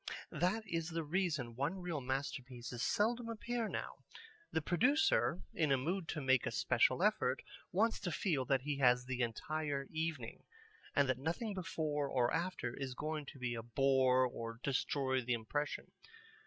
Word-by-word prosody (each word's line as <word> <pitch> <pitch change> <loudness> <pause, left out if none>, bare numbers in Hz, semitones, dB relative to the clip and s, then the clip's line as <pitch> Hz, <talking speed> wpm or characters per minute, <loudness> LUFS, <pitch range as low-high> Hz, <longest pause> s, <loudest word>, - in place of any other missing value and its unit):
That 185 +8 +1
is 165 -4 -2
the 165 -1 -2
reason 155 -8 -1
one 145 +9 -1
reel 175 -5 -3
masterpieces 125 -2 -4
seldom 230 - +1
appear 230 0 -2
now. - - -4 0.5
The - - +2
producer 175 - +3
in 155 -3 +1
a 135 - +5
mood 170 +6 -1
to 155 - -3
make 130 -2 +3
a - - -1
special - - +3
effort - - +2 0.3
wants 225 +5 +2
to 180 -3 -2
feel 155 -5 +1
that 135 0 +2
he 145 -1 -2
has 125 -1 +5
the 130 -1 -2
entire 140 +4 -1
evening, 155 -7 -3 0.5
and 140 -1 +4
that 130 -1 +1
nothing 170 - -2
before 155 -6 -1
or 125 -2 +2
after 165 -8 -1
is 130 -2 -4
going 155 0 -3
to 140 - -9
be 125 -2 -2
a 115 - -3
bore 130 +1 +4
or 115 -2 -5
destroy 130 -1 +1
the 125 0 0
impression. 145 +6 -2
145 Hz, 165 wpm, -36 LUFS, 130-170 Hz, 0.5 s, a